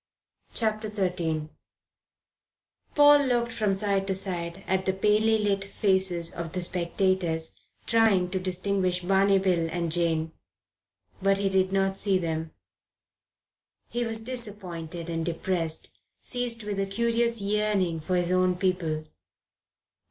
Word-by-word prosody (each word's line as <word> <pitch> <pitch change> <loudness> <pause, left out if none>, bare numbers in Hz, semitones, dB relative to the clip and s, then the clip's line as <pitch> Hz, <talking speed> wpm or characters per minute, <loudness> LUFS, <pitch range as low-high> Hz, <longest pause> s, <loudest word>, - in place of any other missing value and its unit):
CHAPTER 215 -1 0
XIII 170 -6 -1 1.5
PAUL 290 -1 +7
looked 240 -3 +1
from 215 -4 0
side 195 -1 0
to 190 - 0
side 180 -1 -4
at 190 0 0
the 190 - +3
palely 215 +3 +3
lit 200 -2 0
faces 190 -4 0
of 170 -2 -6
the 180 -1 -1
spectators, 175 -2 0 0.3
trying 215 -6 +3
to 190 - -1
distinguish 185 0 -1
Barney 195 +1 +4
Bill 180 -4 +1
and 170 -1 -2
Jane. 165 -1 +1 0.9
But 195 0 +3
he 200 0 +1
did 190 0 +2
not 195 0 +1
see 195 -2 +2
them. 160 -2 -3 1.4
He 240 0 -1
was 225 -1 -2
disappointed 190 -9 -4
and 165 -1 -2
depressed, 165 -1 -2 0.3
seized 245 -2 -2
with 205 -1 -3
a 195 - 0
curious 235 +2 +1
yearning 200 -4 0
for 180 +4 -2
his 175 0 +1
own 185 0 +3
people. 175 -4 -1
190 Hz, 130 wpm, -27 LUFS, 175-210 Hz, 1.5 s, PAUL